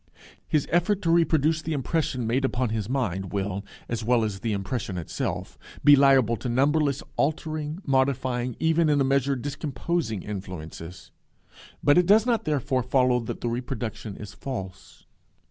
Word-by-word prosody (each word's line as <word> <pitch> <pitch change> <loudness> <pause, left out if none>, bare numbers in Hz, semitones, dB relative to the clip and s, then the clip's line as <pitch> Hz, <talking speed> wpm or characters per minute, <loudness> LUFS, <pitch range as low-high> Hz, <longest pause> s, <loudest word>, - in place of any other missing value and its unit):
His 150 -3 +1
effort 185 +4 +2
to 165 - +2
reproduce 160 -2 +3
the 160 +1 -3
impression 140 -3 -1
made 125 +4 +1
upon 130 -2 0
his 110 -1 -3
mind 95 -8 -2
will, 100 0 -2 0.2
as 115 -1 -3
well 120 0 +3
as 105 -3 -3
the 115 - -2
impression 100 0 -3
itself, 85 - -4 0.2
be 145 - +9
liable 135 -4 +5
to 125 - -4
numberless 140 +3 +2
altering, 155 +3 -2
modifying, 130 -3 0
even, 160 0 +3
in 145 -1 +3
a - - +4
measure, 135 0 +2
discomposing 140 - -3
influences. 90 -4 -8 0.7
But 145 +4 +6
it 180 - +2
does 215 +3 +6
not, 235 -3 +1
therefore, 140 -3 0
follow 125 0 +2
that 115 - -6
the 120 - -1
reproduction 120 -3 -4
is 105 -2 -9
false. 95 -8 -7
130 Hz, 155 wpm, -26 LUFS, 110-150 Hz, 0.7 s, be